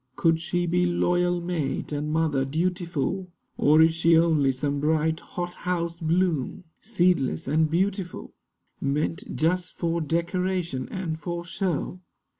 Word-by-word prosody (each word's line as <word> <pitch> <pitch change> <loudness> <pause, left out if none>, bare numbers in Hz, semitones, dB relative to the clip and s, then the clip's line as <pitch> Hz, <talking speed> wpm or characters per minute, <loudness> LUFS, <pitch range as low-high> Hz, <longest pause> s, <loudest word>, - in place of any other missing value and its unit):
Could 165 -1 +2
she 175 +1 -1
be 180 +1 +2
loyal 175 0 +1
mate 170 -6 -2
and 150 +1 -2
mother 155 -4 +1
dutiful? 175 +3 -2 0.3
Or 155 +2 +5
is 160 0 +4
she 165 0 +4
only 160 -5 +3
some 140 +2 -2
bright 160 +2 +1
hothouse 175 -1 -3
bloom, 165 -3 0 0.2
Seedless 175 - +1
and 155 +2 +2
beautiful, 185 +2 -2 0.5
Meant 150 +4 -2
just 180 +3 0
for 170 -1 -1
decoration, 170 -2 -1
and 170 -5 -4
for 170 +2 -4
show? 180 0 -2
170 Hz, 125 wpm, -26 LUFS, 155-180 Hz, 0.5 s, Or